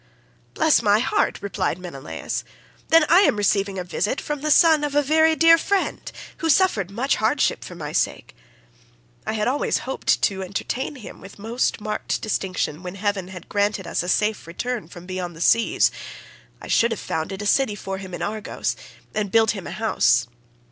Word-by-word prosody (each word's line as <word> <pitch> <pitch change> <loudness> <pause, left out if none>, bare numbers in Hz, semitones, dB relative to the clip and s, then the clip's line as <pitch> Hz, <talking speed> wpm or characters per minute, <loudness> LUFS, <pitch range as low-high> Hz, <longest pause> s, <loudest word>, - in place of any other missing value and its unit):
"Bless 315 -5 +4
my 205 -2 +4
heart," 230 - +1
replied 195 -3 -1
Menelaus, 170 -7 -5 0.4
"then 325 -1 +5
I 345 +4 +6
am 395 - +4
receiving 200 -1 +1
a 180 - -2
visit 200 +7 -2
from 295 -2 -4
the 305 - -1
son 315 -1 +5
of 290 -1 -2
a 290 - +4
very 315 +2 +4
dear 330 +1 +6
friend, 395 +4 -1 0.3
who 325 - -2
suffered 275 - +3
much 245 +7 0
hardship 230 +6 +1
for 180 - -9
my 150 -3 -6
sake. - - -2 0.9
I - - -1
had 210 -1 -1
always 270 +3 +1
hoped 265 +1 0
to 190 -1 +1
entertain 220 +9 -4
him 245 -6 -11
with 195 - -12
most 225 +4 -1
marked 210 0 -3
distinction 185 -6 -2
when 180 0 -7
heaven 200 -2 -2
had 185 -2 -10
granted 205 -2 0
us - - -1
a 175 - -4
safe 210 -3 0
return 215 +2 -4
from 175 +1 -12
beyond 180 -2 -5
the - - -12
seas. 230 +6 +3 0.7
I - - -10
should 235 - +3
have 225 - -3
founded 190 +5 -4
a - - -5
city 215 0 +2
for 195 -1 -5
him 190 -2 -7
in - - -5
Argos, 215 0 -3 0.4
and 210 -2 -1
built 225 -1 +4
him 195 -7 -6
a - - -6
house. 215 - +2
210 Hz, 185 wpm, -23 LUFS, 185-265 Hz, 0.9 s, I